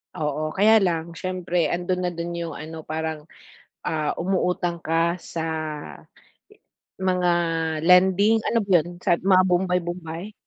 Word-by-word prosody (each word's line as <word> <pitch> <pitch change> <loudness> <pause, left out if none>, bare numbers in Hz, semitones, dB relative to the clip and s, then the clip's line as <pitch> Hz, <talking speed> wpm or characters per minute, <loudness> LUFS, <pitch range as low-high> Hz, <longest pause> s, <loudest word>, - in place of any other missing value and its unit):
Oo, 155 -1 -2
kaya 215 +3 +6
lang 170 -3 -1
siyempre, 175 -1 -1
andun 180 +3 -1
na - - -2
dun 170 +1 -4
yung 165 -3 -4
ano, 160 +2 -8
parang, 160 -1 -4 0.6
ah, 155 -2 0
umuutang 175 -1 -1
ka 165 +1 +1
sa 165 - -5 1.6
mga 180 -1 +1 0.6
lending. 190 +5 +5
Ano 230 - +2
ba 200 - -9
yun, - - -10 0.2
sa - - +4
mga 185 0 +5
bumbay, 180 0 +2
bumbay? 175 +3 -6
175 Hz, 130 wpm, -24 LUFS, 165-185 Hz, 1.6 s, kaya